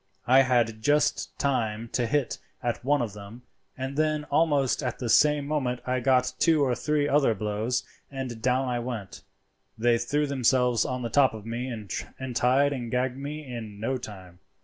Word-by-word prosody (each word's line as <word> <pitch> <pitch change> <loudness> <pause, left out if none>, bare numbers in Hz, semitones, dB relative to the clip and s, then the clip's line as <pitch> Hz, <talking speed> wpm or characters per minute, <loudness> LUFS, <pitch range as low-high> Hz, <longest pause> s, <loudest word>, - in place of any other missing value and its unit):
"I 130 +3 +6
had 120 -4 +1
just 145 +5 +1
time 115 -5 -1
to 120 0 -1
hit 145 0 -1 0.2
at 120 -1 -2
one 145 0 +2
of 110 -4 -5
them, 105 +4 -11 0.3
and 130 +1 -4
then 155 0 +1
almost 145 -4 +2
at 125 -4 -3
the 120 - -4
same 150 +3 +4
moment 135 -5 -1
I 130 0 0
got 125 0 +2
two 160 -4 +4
or 130 -3 +2
three 150 +3 0
other 140 -6 +3
blows, 105 +4 -1 0.3
and 130 -4 -6
down 130 +2 +1
I 125 -1 -1
went; 115 -6 -6 0.6
they 115 +1 +3
threw 145 +5 0
themselves 125 -3 +2
on 125 -1 -3
the 115 - -2
top 135 -2 +3
of 110 -1 -9
me 120 +2 -4
and 120 +2 -6
tied 135 +4 +3
and 120 -4 -5
gagged 125 +1 -1
me 145 +2 -6
in 115 -5 -7
no 130 +5 -1
time. 95 -6 -10
125 Hz, 180 wpm, -27 LUFS, 115-140 Hz, 0.6 s, I